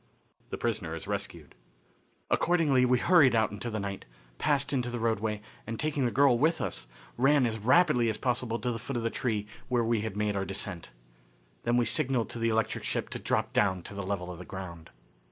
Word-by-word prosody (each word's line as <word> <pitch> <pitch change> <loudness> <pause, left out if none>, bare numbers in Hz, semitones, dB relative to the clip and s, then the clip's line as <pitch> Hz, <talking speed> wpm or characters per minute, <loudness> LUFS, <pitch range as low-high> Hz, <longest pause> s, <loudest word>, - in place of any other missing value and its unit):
The - - -4
Prisoner 105 -8 -2
Is 80 - -7
Rescued. 100 -7 -5 0.8
Accordingly 150 -7 +3
we 125 0 +4
hurried 145 -4 +5
out 110 -2 +2
into 105 +4 -5
the 110 -1 -3
night, 100 -1 -5 0.3
passed 140 -1 +1
into 125 -3 0
the 120 - -3
roadway, 110 -2 -1 0.2
and, 115 -1 -4
taking 150 -3 0
the 120 - +1
girl 135 -2 +4
with 160 +4 +2
us, - - -4 0.3
ran 135 +1 +4
as 110 -1 -2
rapidly 125 - +4
as 110 - -2
possible 120 -1 -1
to 125 +1 -2
the 115 - -4
foot 125 +2 -4
of 115 - -2
the 115 - 0
tree 110 -5 -1 0.2
where 125 -2 +1
we 115 -1 +1
had 110 -2 -4
made 105 -1 0
our 95 - 0
descent. 95 -4 -5 0.8
Then 120 +1 +2
we 120 - +3
signalled 130 -2 +1
to 120 - -5
the 115 0 +1
electric 110 0 0
ship - - -2
to - - -5
drop - - -1
down 95 -3 +2
to - - -9
the 100 - -4
level 95 -2 -3
of 85 - -9
the - - -7
ground. 90 -4 -8
115 Hz, 210 wpm, -29 LUFS, 100-125 Hz, 0.8 s, hurried